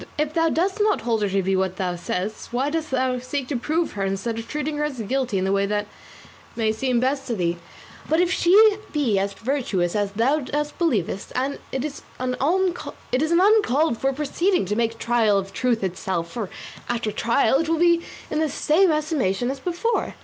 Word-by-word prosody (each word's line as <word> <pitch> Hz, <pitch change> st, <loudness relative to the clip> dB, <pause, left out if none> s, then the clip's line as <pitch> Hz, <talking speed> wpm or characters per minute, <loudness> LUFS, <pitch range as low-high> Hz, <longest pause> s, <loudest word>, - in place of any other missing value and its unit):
If 300 Hz, 0 st, 0 dB
thou 330 Hz, 0 st, +3 dB
dost 370 Hz, +6 st, 0 dB
not 420 Hz, 0 st, +2 dB
hold 230 Hz, -2 st, 0 dB
her 205 Hz, -, +1 dB
to 195 Hz, 0 st, +1 dB
be 190 Hz, +1 st, +1 dB
what 190 Hz, -1 st, 0 dB
thou 185 Hz, -2 st, -2 dB, 0.5 s
why 260 Hz, +4 st, -1 dB
dost 320 Hz, 0 st, -2 dB
thou 255 Hz, -1 st, 0 dB
seek 255 Hz, +1 st, -4 dB
to 285 Hz, -, -1 dB
prove 315 Hz, +7 st, 0 dB
her 200 Hz, -, -3 dB
instead 195 Hz, +4 st, -2 dB
of 230 Hz, -, -7 dB
treating 300 Hz, 0 st, -3 dB
her 300 Hz, -, 0 dB
as 290 Hz, -3 st, -4 dB
guilty 250 Hz, 0 st, -1 dB
in 185 Hz, -, 0 dB
the 190 Hz, -, +1 dB
way 200 Hz, 0 st, +2 dB
that 205 Hz, 0 st, -1 dB, 0.7 s
may 220 Hz, -2 st, +1 dB
seem 245 Hz, +2 st, 0 dB
best 270 Hz, +2 st, 0 dB
to 235 Hz, -, -1 dB
thee? 175 Hz, -3 st, 0 dB, 0.5 s
but 320 Hz, +2 st, +3 dB
if 360 Hz, 0 st, +2 dB
she 410 Hz, +4 st, +5 dB
be 250 Hz, -10 st, +1 dB
as 200 Hz, +1 st, -1 dB
virtuous 215 Hz, -7 st, -1 dB
as 205 Hz, -1 st, 0 dB
thou 270 Hz, +8 st, +2 dB, 0.4 s
believest, 210 Hz, -, -1 dB, 0.4 s
it 265 Hz, +1 st, -2 dB
is 300 Hz, -2 st, -6 dB, 0.2 s
an 255 Hz, 0 st, -2 dB
uncalled 340 Hz, -, +2 dB
for 270 Hz, -, +1 dB
proceeding 300 Hz, -, 0 dB
to 205 Hz, +3 st, -1 dB
make 230 Hz, 0 st, 0 dB
trial 225 Hz, -4 st, +2 dB
of 195 Hz, 0 st, -3 dB
truth 235 Hz, -1 st, 0 dB
itself, 180 Hz, -2 st, -2 dB
for, 220 Hz, -6 st, -4 dB, 0.4 s
after 230 Hz, -3 st, -1 dB
trial, 235 Hz, +5 st, +2 dB
it 325 Hz, 0 st, -1 dB
will 330 Hz, -, +3 dB
but 325 Hz, -, -3 dB
be 340 Hz, -1 st, +4 dB, 0.3 s
in 305 Hz, -, 0 dB
the 315 Hz, -1 st, +1 dB
same 330 Hz, +6 st, +3 dB
estimation 275 Hz, -, 0 dB
as 275 Hz, -, -6 dB
before. 355 Hz, -, -1 dB
255 Hz, 195 wpm, -23 LUFS, 210-310 Hz, 0.7 s, she